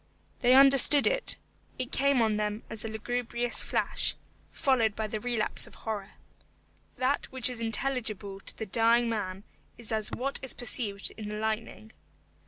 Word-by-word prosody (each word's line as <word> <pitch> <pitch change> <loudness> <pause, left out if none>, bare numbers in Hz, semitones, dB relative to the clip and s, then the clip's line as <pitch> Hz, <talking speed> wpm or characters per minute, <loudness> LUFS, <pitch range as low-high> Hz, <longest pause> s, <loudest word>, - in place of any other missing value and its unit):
They 250 0 +4
understood 275 +1 +8
it. - - +3 0.4
It 255 -1 -5
came 275 -3 +2
on 215 -1 0
them 210 +1 -3
as 220 - +1
a - - -4
lugubrious 240 +2 -2
flash, - - +1 0.4
followed 235 -6 +1
by 220 - -3
the 215 0 -4
relapse 235 -1 +1
of - - -15
horror. 210 -3 -6 0.8
That 265 +2 -2
which 260 -1 +2
is 240 -2 -5
intelligible 225 -4 -3
to - - -4
the 220 - -5
dying 230 +3 +2
man 195 -3 -4 0.3
is 235 -2 -6
as 215 -1 0
what 275 +3 -2
is 265 - -4
perceived 215 -4 -3
in 210 -1 -7
the 210 - -5
lightning. 220 0 -5
225 Hz, 160 wpm, -28 LUFS, 215-250 Hz, 0.8 s, understood